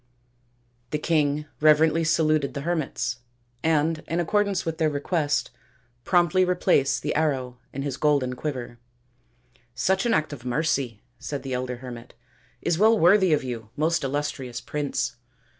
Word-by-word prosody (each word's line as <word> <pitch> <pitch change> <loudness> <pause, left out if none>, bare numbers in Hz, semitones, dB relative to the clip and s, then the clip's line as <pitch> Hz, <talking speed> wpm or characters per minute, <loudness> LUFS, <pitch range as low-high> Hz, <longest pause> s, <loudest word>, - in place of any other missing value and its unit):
The 150 - -1
king 150 -1 +1
reverently 155 +2 +4
saluted 155 -2 +1
the 140 - -3
hermits 140 -7 -2 0.4
and 160 0 +1
in 165 - -1
accordance 200 +3 +1
with 165 -1 -3
their 160 -1 +3
request 145 0 -1 0.5
promptly 175 +1 +3
replaced 140 -8 +2
the 150 - -1
arrow 130 -5 -1
in 135 - -4
his 140 -2 -3
golden 140 -4 +1
quiver. 125 -4 -5 0.5
" 120 0 -36
Such 190 - +1
an 230 - +2
act 155 -1 0
of 135 - -8
mercy/' 125 -3 -1 0.2
said 145 -2 -5
the 135 -1 -4
elder 125 0 -2
hermit, 120 -1 -10 0.3
" - - -35
is 165 - +1
well 220 +2 +5
worthy 190 0 +5
of 150 - +2
you, 115 -4 -6
most 160 +2 +1
illustrious 135 -3 -3
Prince. 140 -5 -3
150 Hz, 150 wpm, -25 LUFS, 130-160 Hz, 0.5 s, well